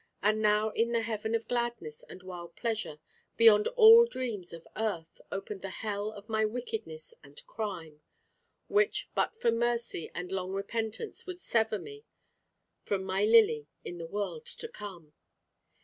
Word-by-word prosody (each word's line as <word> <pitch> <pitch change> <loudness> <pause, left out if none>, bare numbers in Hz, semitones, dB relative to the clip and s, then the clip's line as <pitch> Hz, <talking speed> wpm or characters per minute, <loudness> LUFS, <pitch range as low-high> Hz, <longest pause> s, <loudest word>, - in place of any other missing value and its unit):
And 215 +1 +3
now 210 +1 +3
in 235 +2 +1
the 230 -1 +2
heaven 220 0 -2
of 230 - -2
gladness 235 -11 -2
and 185 - -12
wild 175 -2 -8
pleasure, 225 -9 -2 0.4
beyond 220 -2 +7
all 460 +1 +10
dreams 235 - -4
of 165 -1 -10
earth, 200 -7 -3
opened 195 0 -5
the 195 - -5
hell 205 +1 -3
of 210 -1 -12
my 220 -1 +1
wickedness 445 - -4
and - - -12
crime; 170 - -6 0.7
which 415 +1 +1
but - - 0
for 235 - +3
mercy 235 -6 -1
and 180 +1 -5
long 190 0 -2
repentance 220 - -4
would 365 -1 -6
sever 220 -8 +1
me 425 - -10 0.8
from 195 -2 -2
my 190 +2 +1
Lily 210 -10 +5 0.2
in 175 - -6
the 165 - -5
world 210 - -4
to 475 -1 -5
come. 180 - -10
215 Hz, 155 wpm, -30 LUFS, 190-235 Hz, 0.8 s, all